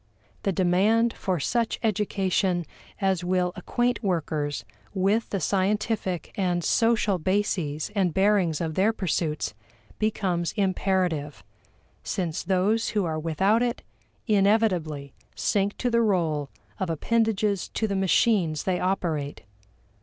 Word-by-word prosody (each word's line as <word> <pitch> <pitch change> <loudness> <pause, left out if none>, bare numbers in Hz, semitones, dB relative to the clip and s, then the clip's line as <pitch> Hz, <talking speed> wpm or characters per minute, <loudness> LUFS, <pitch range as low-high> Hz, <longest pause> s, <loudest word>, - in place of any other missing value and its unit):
The 195 - 0
demand 200 +6 +3
for 185 -3 -2
such 230 - 0
education 190 -4 0 0.3
as 190 -3 +1
will 180 0 +1
acquaint 240 +6 -1
workers 155 -7 -2 0.3
with 200 +4 +1
the 195 - -1
scientific 195 -1 -1
and 180 -3 0
social 220 -4 +2
bases 175 -4 -1
and 190 -4 +1
bearings 190 -4 +2
of 160 -2 -2
their 200 +7 +2
pursuits 155 - -1 0.5
becomes 190 -6 0
imperative, 185 -7 0 0.6
since 175 -3 -2
those 200 +4 +1
who 200 - +2
are 160 -1 -2
without 190 +8 +2
it 245 -1 -1 0.4
inevitably 195 - +1 0.2
sink 200 0 0
to 245 - -1
the 235 0 +3
role 165 -9 +1 0.3
of 190 -3 -1
appendages 210 +2 +1
to 220 - -1
the 200 - -2
machines 190 -4 +2
they 185 -2 0
operate. 165 -6 -1
190 Hz, 120 wpm, -26 LUFS, 170-210 Hz, 0.6 s, demand